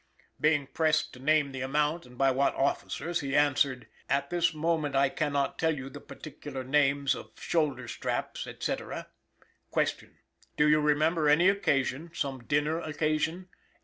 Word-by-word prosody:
Being 150 -2 +3
pressed 155 +2 +1
to 125 - -12
name 145 +1 +2
the 130 -1 -5
amount 150 +3 0
and 125 0 -16
by 135 0 +4
what 135 +2 +1
officers, 165 +5 -1
he 140 -2 -2
answered: 140 -3 +2 0.2
"At 140 0 0
this 175 -1 +2
moment, 155 -2 -1
I 135 0 +4
cannot 140 -1 -1
tell 160 -2 +1
you 135 0 -7
the - - -9
particular 145 -3 -8
names 140 0 +2
of - - -9
shoulder 140 -7 0
straps, - - -3
&c. - - 0
"Q. - - -5 0.5
Do 150 - +4
you 150 0 +5
remember 155 +1 +2
any 170 +6 +6
occasion 150 -5 0
some 135 -4 -3
dinner 150 +4 +1
occasion? 155 +3 -1
145 Hz, 150 wpm, -29 LUFS, 135-155 Hz, 0.5 s, any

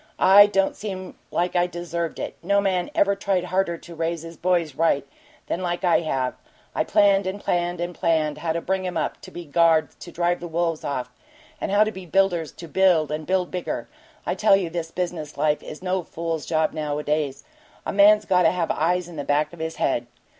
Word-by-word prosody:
It 205 +2 +7
don't 195 -1 +2
seem 190 -3 -6 0.2
like 175 +1 -1
I 175 0 +3
deserved 170 -1 -4
it - - -5
no 200 +3 +2
man 185 -3 0
ever 200 0 +3
tried 195 -2 0
harder 180 -1 0
to 170 - -12
raise 165 0 -2
his 165 0 -9
boys 170 -4 0
right 145 -1 +1 0.4
than 185 - -3
I 175 0 +2
have. 135 -6 -1 0.4
I - - +1
planned 200 -1 +3
and 190 +2 -3
planned 175 -2 -1
and 175 +1 -3
planned 160 -4 0
how 165 -1 -1
to 170 - -2
bring 190 +1 -1
'em 180 - -3
up - - -2
to - - -10
be 175 0 -8
guards 160 -1 +3
to 175 - -11
drive 175 +1 0
the 175 - -6
wolves 165 -1 -1
off, 130 -3 -3 0.5
and - - -2
how 205 +1 +5
to 215 - -2
be 190 -2 -10
builders 175 -3 +1
to 170 - -10
build, 170 -4 +3
and 155 0 -4
build 185 -1 0
bigger. 180 -1 -4 0.4
I - - 0
tell 215 -2 +4
you 185 -4 -1
this 165 -1 -3
business 170 -4 -4
life 150 +1 +1
is 155 - -9
no 185 0 0
fool's 165 -1 -4
job 160 -1 +1
nowadays 150 -2 -2 0.4
a - - -2
man's 210 +1 +6
got 180 -2 +3
to 165 - +5
have 175 -2 -1
eyes 180 +2 0
in 170 -2 -10
the 145 - -3
back 150 +2 0
of 170 - -12
his 160 0 -3
head. 120 -3 0
175 Hz, 210 wpm, -24 LUFS, 160-185 Hz, 0.5 s, It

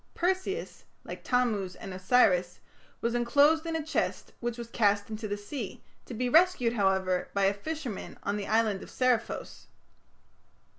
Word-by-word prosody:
Perseus, 375 +4 -2 0.2
like - - -8
Tammuz 215 -8 0
and 190 - -8
Osiris, 185 -3 +3 0.4
was 235 0 0
enclosed 285 +7 +3
in 325 - -2
a 315 -2 -2
chest 315 - -2
which 240 -1 -3
was 235 -1 -6
cast 205 -1 +2
into 215 0 -4
the 205 0 -3
sea, 205 +1 -6 0.2
to 245 - -6
be 250 +3 -1
rescued, 320 -5 +4
however, 190 -4 +1
by 200 -1 +3
a 195 - +3
fisherman 270 0 -6
on 200 - -1
the 205 -1 -4
island 215 -3 +2
of - - -10
Seriphos. 250 -3 -1
230 Hz, 155 wpm, -29 LUFS, 200-265 Hz, 0.4 s, rescued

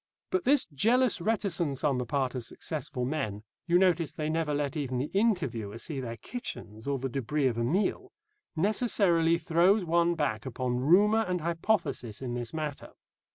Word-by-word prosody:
But 370 -1 0
this 280 +1 +4
jealous 230 - +3
reticence 180 - -1
on 140 -4 +2
the 125 - -3
part 130 0 0
of 125 -2 -4
successful 130 0 -4
men 125 -8 -3 0.2
you 175 0 +4
notice 175 -4 +2
they 155 0 -3
never 160 -1 0
let 145 +1 -1
even 135 -4 -2
the 135 +4 -2
interviewer 170 - 0
see 140 +3 -5
their 115 -3 -5
kitchens 115 - -7
or 140 -1 0
the 135 +1 -3
débris 135 +1 0
of 115 - -5
a - - +1
meal 200 - 0 0.4
necessarily 175 -3 +2
throws 180 +4 +3
one 170 +1 +2
back 110 -9 -1
upon 125 0 -2
rumour 205 - +4
and 180 -1 -1
hypothesis 165 - -1
in 125 -2 -4
this 120 -1 -4
matter. 150 -3 -5
155 Hz, 170 wpm, -29 LUFS, 130-185 Hz, 0.4 s, this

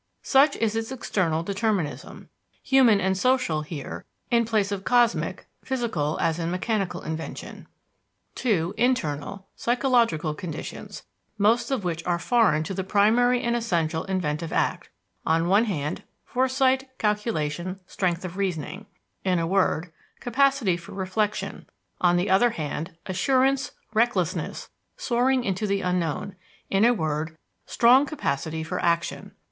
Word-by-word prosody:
Such 280 +2 +4
is 225 -1 0
its 225 +2 -2
external 175 -10 -1
determinism 200 -4 -2 0.3
human 255 -6 +5
and 190 0 +1
social 250 -7 +1
here 150 -2 -7 0.3
in 235 -1 +4
place 215 -3 +1
of 195 -1 -3
cosmic, 200 -8 +2 0.2
physical, 225 - -1
as 165 0 0
in 165 0 -1
mechanical 195 +1 -2
invention. 160 +1 -6 0.7
(2) 190 -8 0
Internal, 195 - -1
psychological 235 - +1
conditions, 160 0 -7 0.3
most 215 +4 +3
of 265 -7 -1
which 170 -2 -2
are 175 -1 +2
foreign 185 -6 +3
to 175 - -5
the 190 - -2
primary 230 +6 +3
and 235 0 +1
essential 170 -8 0
inventive 165 -4 -2
act: - - -1 0.3
on 165 +1 +2
one 200 +5 +4
hand, 150 -8 -3 0.2
foresight, 260 +1 +1
calculation, 185 -4 -1
strength 180 -1 -1
of 180 +1 -7
reasoning; 190 +1 -3 0.4
in 185 -2 +2
a 165 - 0
word, 175 -2 +1 0.3
capacity 260 -6 +2
for 170 - -11
reflection; 200 +2 -2 0.3
on 175 -1 +3
the 180 +3 0
other 200 +6 +4
hand, 165 -2 -5
assurance, 265 +7 +1 0.2
recklessness, 215 -7 0 0.3
soaring 255 +1 +1
into 205 0 -1
the 200 0 0
unknown 180 +1 -1 0.4
in 195 +3 +4
a 240 - +6
word, 160 -5 -2 0.3
strong 255 +4 +5
capacity 160 - -2
for 160 - -3
action. 170 0 -1
195 Hz, 130 wpm, -25 LUFS, 165-235 Hz, 0.7 s, a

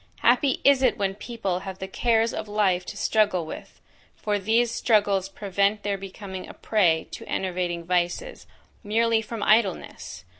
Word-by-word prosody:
Happy 250 +3 +3
is 275 -2 +5
it 255 -2 +3
when 195 -2 0
people 200 -3 -3
have 190 -1 -7
the 190 - -6
cares 225 +3 +1
of - - -4
life 190 -4 +1
to - - -7
struggle 210 -6 +1
with; - - -10 0.4
for 205 -1 -1
these 225 +4 +2
struggles 205 -5 +2
prevent 200 +1 0
their 205 -1 0
becoming 190 -1 -8
a - - -11
prey 175 -7 +1
to - - -8
enervating 175 -2 -2
vices, 180 - -2 0.4
merely 225 +2 +2
from 225 0 -5
idleness! 215 -4 0
205 Hz, 155 wpm, -25 LUFS, 190-225 Hz, 0.4 s, is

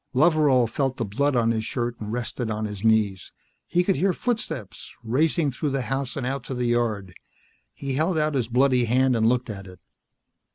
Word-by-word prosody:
Loveral 145 -4 +4
felt 135 +3 -1
of - - -33
the 115 - -1
blood 140 0 +2
on 115 -1 +3
his 110 -1 -1
shirt 120 0 -3
and 105 -1 -5
rested 120 0 -3
on 110 0 -2
his 105 -2 -6
knees. 110 -4 +2 0.4
He 175 +1 +2
could 190 +1 +1
hear 190 +1 +2
footsteps, 225 - -4
racing 145 +6 +1
through 145 +4 -2
the 135 -1 -1
house 135 +1 -3
and 135 - -2
out 135 0 -2
to 130 - -4
the 125 0 -1
yard. 110 -6 0 0.6
He 140 -1 -5
held 160 +5 +1
out 155 0 +1
his 125 -5 0
bloody 125 0 +3
hand 130 +2 +3
and 110 0 +3
looked 125 -1 0
at 95 -2 -8
it. 90 0 -13
125 Hz, 205 wpm, -25 LUFS, 110-140 Hz, 0.6 s, Loveral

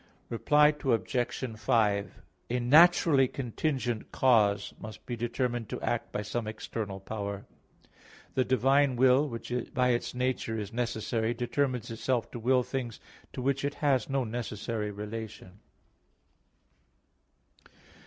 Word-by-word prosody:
Reply 150 +6 +4
Obj. 120 -1 -1
5: 105 -3 +1 0.3
A 125 +1 0
naturally 145 +1 +6
contingent 125 -2 -3
cause 105 -6 +3
must 110 0 -10
be 120 - -4
determined 120 -1 -2
to - - -4
act - - -2
by 105 - -3
some 105 +2 -3
external 110 -2 -5
power. 100 0 -5 0.9
The 130 - +2
divine 135 +2 +3
will, 130 +4 +4
which 115 0 -6 0.2
by 125 -1 +3
its 120 0 -1
nature 125 -3 -1
is 105 0 -5
necessary, 115 -1 -1
determines 125 -1 -1
itself 115 +1 -1
to 120 - -6
will 125 +2 +3
things 125 -3 -4 0.3
to 125 - -5
which 135 +1 0
it 145 0 -2
has 135 -5 +1
no 135 -1 +1
necessary 110 -2 -4
relation. 105 -2 -7
120 Hz, 125 wpm, -29 LUFS, 110-130 Hz, 0.9 s, naturally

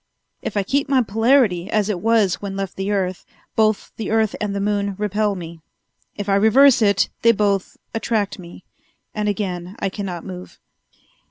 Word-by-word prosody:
If - - -4
I 200 - +2
keep 280 +7 0
my 265 -3 +4
polarity 225 -4 +2
as 215 -2 +1
it 205 -5 -2
was 220 -2 +2
when 200 -1 -5
left 195 -1 -4
the 195 +1 -3
earth, 185 -3 -1 0.3
both 215 -1 +1
the 220 - -4
earth 220 -1 +1
and 205 -1 -2
the - - -1
moon 200 -1 -1
repel 210 0 0
me. 170 -2 -8 0.6
If 205 -1 -5
I 200 - +2
reverse 235 +6 +5
it, 200 -2 +3
they 230 - +6
both 200 -3 0 0.2
attract 220 -3 -1
me, 175 0 -12 0.5
and 210 -1 -1
again 185 -2 -3
I 195 - -1
cannot 185 -3 -5
move. 180 -1 -9
205 Hz, 175 wpm, -21 LUFS, 195-220 Hz, 0.6 s, they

